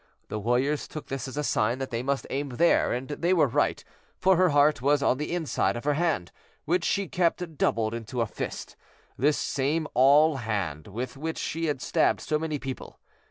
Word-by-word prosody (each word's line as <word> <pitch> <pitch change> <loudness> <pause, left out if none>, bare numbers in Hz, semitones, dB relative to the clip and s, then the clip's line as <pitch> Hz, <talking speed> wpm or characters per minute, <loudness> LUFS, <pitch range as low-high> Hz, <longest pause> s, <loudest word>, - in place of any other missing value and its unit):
The 105 - -3
warriors 125 +7 0
took 155 - -8
this 135 -1 -4
as 130 - -8
a 150 - 0
sign 115 -3 +1
that 135 0 -5
they 115 0 -1
must 135 +1 -1
aim 140 +1 -2
there, 170 +7 +3
and 125 +2 -3
they 170 +5 0
were 165 - +5
right, 125 - 0 0.3
for 190 0 +4
her 180 +1 +4
heart 145 -2 +3
was 140 +1 +2
on 130 - +2
the 150 - -3
inside 170 -8 0
of 120 - -6
her 150 +1 +2
hand, 150 - 0 0.3
which 175 +2 +1
she 200 +1 0
kept 170 -2 -1
doubled 110 0 +1
into 115 +2 -5
a 115 - +2
fist, 110 - -6 0.4
this 145 +4 +2
same 145 +4 -1
awl 140 +4 +5
hand 100 - -3
with 120 +6 -5
which 160 +3 -4
she 165 +1 -2
had 145 -4 -2
stabbed 160 - +2
so 150 -1 -1
many 155 -1 -2
people. 135 -2 -7
140 Hz, 205 wpm, -27 LUFS, 125-160 Hz, 0.4 s, were